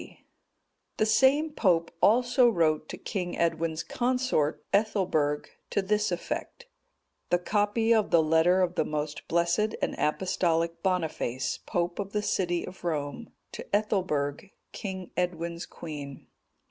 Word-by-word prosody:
D.] - - -14 0.8
The 215 - +3
same 270 +8 +4
pope 175 - +2
also 245 +2 +5
wrote 155 -6 +1
to - - -6
King 180 -4 -4
Edwin's 165 -1 0
consort, 250 - 0
Ethelberg, 180 -9 +1 0.2
to - - 0
this 210 +1 +1
effect: 175 - -4 0.6
THE 175 - +4
COPY 210 +5 +1
OF 220 -2 +2
THE 165 -1 +5
LETTER 165 +4 +4
OF 180 -1 0
THE - - 0
MOST 150 -1 -4
BLESSED 170 +6 +1
AND - - -1
APOSTOLIC 165 0 0
BONIFACE, 160 -9 -1
POPE 175 +1 -1
OF 200 0 -4
THE 210 0 0
CITY 175 -4 0
OF 185 - -11
ROME, 155 +5 -3 0.2
TO - - -7
ETHELBERG, 185 -6 -1 0.2
KING 190 -3 -6
EDWIN'S 170 -1 -2
QUEEN. 145 -4 -8
175 Hz, 135 wpm, -28 LUFS, 160-210 Hz, 0.8 s, also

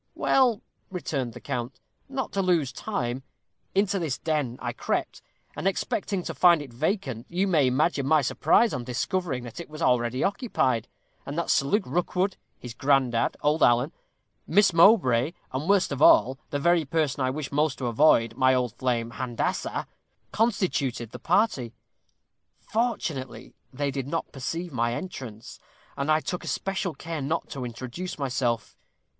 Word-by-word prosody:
"Well," 250 -5 +3 0.3
returned 140 - -3
the - - -9
count, 120 +1 -4 0.3
"not 265 -3 -3
to 195 - 0
lose 170 -8 +2
time, 130 - -3 0.5
into 200 0 +2
this 150 -7 -2
den 145 -5 -1
I - - -3
crept, - - -2 0.3
and, - - -2
expecting 200 -1 -1
to - - -4
find 175 -2 +5
it 140 -5 -9
vacant, 135 - -2
you 180 +3 0
may 155 -8 +3
imagine 140 +2 +1
my 155 0 +4
surprise 230 - +3
on 125 - -3
discovering 130 +2 -2
that 120 +6 -8
it 170 - -8
was 155 0 -9
already 125 -3 +1
occupied, 130 - 0 0.4
and 145 - -6
that 170 - 0
Sir 135 - +2
Luke 205 +6 +2
Rookwood, 180 +2 0 0.2
his 125 -2 -8
granddad, 130 -2 +1
old 150 +2 +2
Alan, 120 +5 +4 0.6
Miss 195 +2 +4
Mowbray, 165 - +5 0.2
and, 140 +7 -3
worst 200 -5 +3
of 140 0 -3
all, 130 -2 +6
the 145 - -1
very 170 +2 +3
person 150 -2 0
I 130 - +1
wished 140 +1 -4
most 150 -1 +1
to 130 - -4
avoid, 115 -2 +4
my 130 0 +4
old 125 -3 0
flame 120 -2 0
Handassah, 120 0 -2 0.5
constituted 165 - 0
the - - -8
party. 160 - +1 0.8
Fortunately, 155 - -3 0.2
they 140 +1 -2
did 135 -1 -4
not 165 +3 -3
perceive 165 +5 -4
my 120 -1 0
entrance, 125 - -8 0.4
and 140 +2 0
I 155 +1 +3
took 180 - -4
especial 190 -3 -2
care 165 -2 -5
not 160 +5 -2
to 135 -3 -5
introduce 130 +9 -6
myself. 125 -4 -1
145 Hz, 160 wpm, -26 LUFS, 125-180 Hz, 0.8 s, all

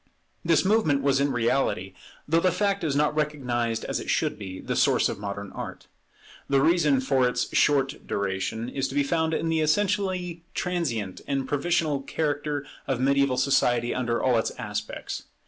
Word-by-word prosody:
This 165 +1 +3
movement 175 -10 +2
was 140 -1 +3
in 140 0 +2
reality, 120 -6 0 0.3
though 165 +3 +3
the 185 +2 +2
fact 200 +1 0
is 150 -4 0
not 150 +1 +2
recognized 125 -7 -1
as - - -2
it - - -7
should - - 0
be, 95 -2 -7
the - - -3
source - - +3
of - - -5
modern 100 -1 -5
Art. - - -7 0.6
The 140 -1 +4
reason 155 -2 +3
for 130 -1 +2
its - - -2
short 140 0 +2
duration 100 +3 -2
is 135 +1 -2
to 135 - -7
be 145 - +3
found 160 +2 0
in 165 - -1
the 165 0 +1
essentially 185 0 0
transient 130 - -2
and 135 -1 -1
provisional 150 -1 0
character 145 0 -2 0.2
of 135 -3 0
mediaeval 140 0 +2
society 120 -3 +2
under 120 -2 -1
all 125 -3 +3
its - - -1
aspects. 105 0 -5
140 Hz, 170 wpm, -26 LUFS, 120-160 Hz, 0.6 s, The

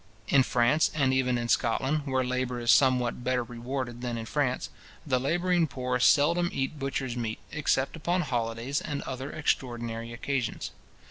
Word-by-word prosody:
In 140 - +5
France, 125 +4 +3
and 135 -4 +2
even 125 -2 +2
in 120 0 -2
Scotland, 135 +6 +1
where 130 -1 +1
labour 125 0 -2
is 120 +1 +3
somewhat 125 -3 +3
better 125 -1 +1
rewarded 120 +1 -5
than 120 -2 -3
in 115 - -5
France, 130 0 -1 0.3
the 130 -4 +1
labouring 175 +4 +1
poor 125 -1 -2
seldom 170 +6 +4
eat 135 +3 -3
butcher's 135 -2 -2
meat, 115 -2 -3
except 140 -2 0
upon 175 +3 0
holidays, 120 0 -2
and 145 -1 -4
other 130 +1 -5
extraordinary 120 -5 -2
occasions. 125 0 -3
130 Hz, 155 wpm, -28 LUFS, 120-140 Hz, 0.3 s, In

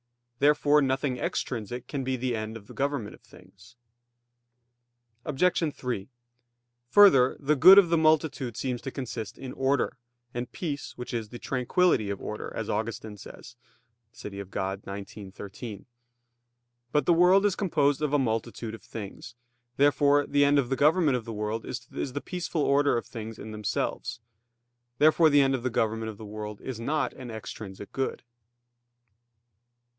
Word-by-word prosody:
Therefore 150 +1 +4
nothing 130 -1 0
extrinsic 120 0 -3
can 140 -2 -3
be 130 0 -1
the 125 -1 -1
end 110 +1 -4
of 105 - -15
the - - -13
government 140 -6 -2
of - - -16
things. 95 +5 -18 1.5
Obj. 165 +2 +1
3: 120 -6 -4 0.8
Further, 135 -9 +6
the 150 +1 +2
good 180 +8 +9
of 195 -4 +7
the 170 -1 +3
multitude 155 -6 +1
seems 125 -2 -2
to 135 - -5
consist 120 -5 -6
in 130 -1 -7
order, 135 0 0 0.4
and 120 0 -4
peace 145 -3 -5
which 125 - -6
is 115 -3 -3
the 120 - -8
"tranquillity 125 - +1
of 100 -1 -3
order," 105 - -6
as 110 - -3
Augustine 110 0 -4
says 120 +3 -12 0.6
(De - - -24
Civ. 105 - -7 0.2
Dei 100 +1 -4
xix, 100 -1 -11
13). 100 +1 -8 1.1
But 150 - +2
the 175 - +5
world 180 +4 +5
is 200 -2 +2
composed 150 -7 +1
of 150 -2 0
a 145 - +4
multitude 115 -2 -2
of 115 - -9
things. 110 +2 -9 0.4
Therefore 145 0 +4
the 145 0 +3
end 145 0 +4
of 130 -4 +1
the 135 - +1
government 150 0 +3
of 115 - -7
the 115 - -6
world 105 +1 -3
is - - -6 0.3
the 145 - -2
peaceful 175 -3 -3
order 140 -2 +3
in 115 - -2
things 115 -1 -7
themselves. 105 +1 -3 0.8
Therefore 155 +2 +5
the 145 -1 +5
end 135 0 +3
of 130 - -1
the 130 - -1
government 110 -1 -1
of 105 - -8
the 110 - -9
world 105 0 -7
is 130 -4 -6
not 150 +6 -1
an 125 -2 -9
extrinsic 105 -3 -8
good. 135 0 -3
125 Hz, 160 wpm, -27 LUFS, 110-145 Hz, 1.5 s, good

